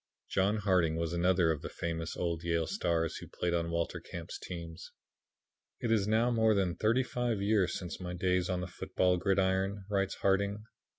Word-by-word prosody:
John 100 Hz, +3 st, +2 dB
Harding 90 Hz, -6 st, +2 dB
was 85 Hz, 0 st, -2 dB
another 85 Hz, -1 st, +3 dB
of 75 Hz, -, -2 dB
the -, -, -5 dB
famous 80 Hz, 0 st, -4 dB
old 85 Hz, -2 st, -2 dB
Yale 85 Hz, -1 st, +1 dB
stars 80 Hz, 0 st, 0 dB
who -, -, -9 dB
played 85 Hz, -1 st, -2 dB
on 85 Hz, -1 st, 0 dB
Walter 85 Hz, 0 st, -1 dB
Camp's 85 Hz, -1 st, -7 dB
team. 85 Hz, -2 st, -7 dB, 1.0 s
"It 115 Hz, -, -1 dB
is 105 Hz, -3 st, +3 dB
now 115 Hz, +3 st, +3 dB
more 110 Hz, -2 st, +3 dB
than 95 Hz, -3 st, +1 dB
thirty 115 Hz, +4 st, +2 dB
five 120 Hz, -4 st, -1 dB
years 100 Hz, -3 st, +2 dB
since 90 Hz, -2 st, -6 dB
my 90 Hz, 0 st, -4 dB
days 90 Hz, 0 st, +1 dB
on 90 Hz, -1 st, 0 dB
the 90 Hz, -, -4 dB
football 90 Hz, 0 st, 0 dB
gridiron," 95 Hz, +1 st, +1 dB
writes 100 Hz, -1 st, +1 dB
Harding. 100 Hz, +2 st, +1 dB
90 Hz, 180 wpm, -32 LUFS, 85-100 Hz, 1.0 s, another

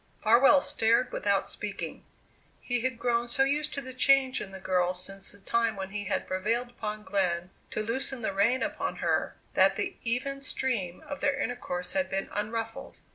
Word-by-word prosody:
Farwell 260 Hz, +5 st, +7 dB
stared 230 Hz, +2 st, +2 dB
without 200 Hz, -1 st, +1 dB
speaking. 205 Hz, -1 st, -5 dB, 0.6 s
He 245 Hz, 0 st, -1 dB
had 260 Hz, -1 st, -1 dB
grown 240 Hz, 0 st, +1 dB
so 270 Hz, +3 st, +3 dB
used 295 Hz, +2 st, +1 dB
to 280 Hz, -, -2 dB
the 260 Hz, -1 st, -8 dB
change 265 Hz, 0 st, +4 dB
in 195 Hz, -, -6 dB
the 190 Hz, -, -8 dB
girl 185 Hz, -1 st, +1 dB
since 195 Hz, +2 st, -6 dB
the -, -, -10 dB
time 230 Hz, +2 st, +1 dB
when 195 Hz, 0 st, -5 dB
he 205 Hz, 0 st, -4 dB
had 195 Hz, -, -1 dB
prevailed 225 Hz, +6 st, -1 dB
upon 215 Hz, -3 st, -5 dB
Glenn 185 Hz, -2 st, 0 dB, 0.2 s
to 215 Hz, -, -2 dB
loosen 250 Hz, +2 st, -2 dB
the 200 Hz, -, 0 dB
rein 225 Hz, +7 st, +3 dB
upon -, -, -2 dB
her, -, -, 0 dB, 0.2 s
that -, -, +5 dB
the -, -, -2 dB
even 270 Hz, +4 st, -1 dB
stream 235 Hz, -11 st, -2 dB
of 285 Hz, -1 st, -5 dB
their 280 Hz, -2 st, +1 dB
intercourse 180 Hz, -7 st, -3 dB
had 190 Hz, 0 st, 0 dB
been 195 Hz, 0 st, -2 dB
unruffled. 225 Hz, +2 st, -4 dB
225 Hz, 185 wpm, -29 LUFS, 195-255 Hz, 0.6 s, Farwell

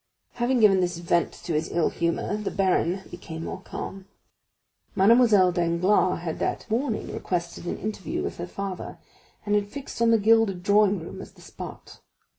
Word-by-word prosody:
Having 240 Hz, 0 st, 0 dB
given 195 Hz, -3 st, +6 dB
this 175 Hz, -1 st, -1 dB
vent 170 Hz, 0 st, +1 dB
to 170 Hz, -1 st, -6 dB
his 155 Hz, +1 st, -1 dB
ill 170 Hz, -1 st, +1 dB
humor, 170 Hz, +4 st, -1 dB
the 210 Hz, -1 st, -3 dB
baron 190 Hz, -1 st, +1 dB
became 165 Hz, -2 st, -7 dB
more 190 Hz, -, -6 dB
calm; 195 Hz, 0 st, -7 dB, 0.9 s
Mademoiselle 210 Hz, -2 st, +5 dB
Danglars 175 Hz, +2 st, +2 dB
had 165 Hz, -2 st, -4 dB
that -, -, -2 dB
morning 235 Hz, 0 st, -1 dB
requested 175 Hz, -1 st, -3 dB
an -, -, -2 dB
interview 210 Hz, -2 st, -4 dB
with -, -, -4 dB
her 175 Hz, -, -5 dB
father, 195 Hz, 0 st, -6 dB, 0.5 s
and 205 Hz, -, 0 dB
had 205 Hz, -1 st, +2 dB
fixed 275 Hz, -1 st, -7 dB
on 230 Hz, -, +5 dB
the 230 Hz, -, +5 dB
gilded 215 Hz, -4 st, +3 dB
drawing 205 Hz, 0 st, +4 dB
room 165 Hz, -, -8 dB
as -, -, -11 dB
the -, -, -18 dB
spot. -, -, -10 dB
190 Hz, 170 wpm, -26 LUFS, 175-210 Hz, 0.9 s, given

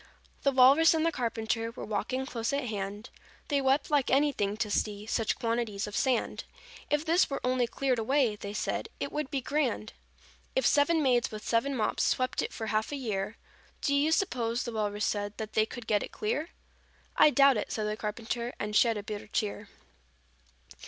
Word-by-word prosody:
"The 275 Hz, -, +3 dB
Walrus 275 Hz, +6 st, +6 dB
and 320 Hz, 0 st, +1 dB
the 330 Hz, -, +2 dB
Carpenter 230 Hz, -3 st, -2 dB
Were 230 Hz, -, -8 dB
walking 255 Hz, +5 st, -2 dB
close 230 Hz, -3 st, -3 dB
at 280 Hz, -, 0 dB
hand; 205 Hz, +2 st, -5 dB, 0.4 s
They 285 Hz, -2 st, +2 dB
wept 270 Hz, +3 st, +1 dB
like 285 Hz, -3 st, +2 dB
anything 265 Hz, -8 st, +2 dB
to 215 Hz, -2 st, -2 dB
see 205 Hz, 0 st, -1 dB
Such 225 Hz, 0 st, 0 dB
quantities 230 Hz, -3 st, -1 dB
of 205 Hz, -, -7 dB
sand: 260 Hz, -4 st, 0 dB, 0.5 s
'If 295 Hz, +1 st, +1 dB
this 340 Hz, +3 st, +3 dB
were 275 Hz, -, -2 dB
only 250 Hz, -1 st, +1 dB
cleared 255 Hz, 0 st, 0 dB
away,' 245 Hz, -1 st, +2 dB
They 205 Hz, 0 st, -7 dB
said, -, -, -2 dB
'it -, -, -3 dB
would 300 Hz, -2 st, -3 dB
be 275 Hz, -, -2 dB
grand!' 255 Hz, -6 st, -1 dB, 0.6 s
"'If -, -, +2 dB
seven 310 Hz, +2 st, +4 dB
maids 245 Hz, -3 st, +3 dB
with 215 Hz, -1 st, -8 dB
seven 270 Hz, +4 st, +1 dB
mops 220 Hz, -, 0 dB
Swept 255 Hz, 0 st, +1 dB
it -, -, -3 dB
for 225 Hz, -, -5 dB
half 220 Hz, +2 st, -1 dB
a -, -, -2 dB
year, 210 Hz, -6 st, -3 dB, 0.4 s
Do 280 Hz, -, +1 dB
you 290 Hz, +3 st, +3 dB
suppose,' 245 Hz, -10 st, 0 dB
the 240 Hz, -, -4 dB
Walrus 210 Hz, -1 st, -1 dB
said, 205 Hz, 0 st, -2 dB
'That 215 Hz, -1 st, -6 dB
they 220 Hz, 0 st, +3 dB
could 240 Hz, 0 st, -8 dB
get 210 Hz, -2 st, +2 dB
it -, -, -6 dB
clear?' 295 Hz, +10 st, -2 dB, 0.7 s
'I -, -, +8 dB
doubt 275 Hz, -3 st, +5 dB
it,' 210 Hz, -, -3 dB
said 215 Hz, -, -2 dB
the 210 Hz, 0 st, -1 dB
Carpenter, 230 Hz, +3 st, -4 dB
And 210 Hz, 0 st, -3 dB
shed 230 Hz, 0 st, +4 dB
a 205 Hz, -, -5 dB
bitter 210 Hz, 0 st, -6 dB
tear." 205 Hz, -1 st, -3 dB
235 Hz, 195 wpm, -29 LUFS, 215-275 Hz, 0.7 s, I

